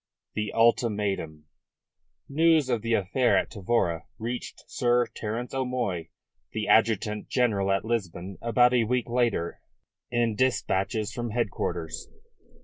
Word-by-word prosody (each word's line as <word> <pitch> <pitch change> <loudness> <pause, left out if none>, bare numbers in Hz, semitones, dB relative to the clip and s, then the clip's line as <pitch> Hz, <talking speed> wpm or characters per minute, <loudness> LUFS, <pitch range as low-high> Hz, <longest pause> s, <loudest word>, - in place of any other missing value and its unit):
THE 105 -1 -2
ULTIMATUM 105 -9 +1 0.8
News 160 -1 +3
of 120 -3 +1
the 115 +1 +1
affair 120 +6 +2
at - - 0
Tavora 95 -5 0
reached 120 +2 -5
Sir 120 0 +2
Terence 115 +3 -4
O'Moy, 125 -11 -2 0.4
the 110 -1 -2
Adjutant 105 -1 +2
General 105 -6 +2
at 95 +2 +1
Lisbon, 95 -5 -3
about 120 +1 +4
a 120 -2 +3
week 125 +1 0
later 120 -8 0 0.5
in 120 -2 +1
dispatches 105 -3 0
from 120 -1 -3
headquarters. 90 -8 -3
115 Hz, 120 wpm, -27 LUFS, 100-120 Hz, 0.8 s, about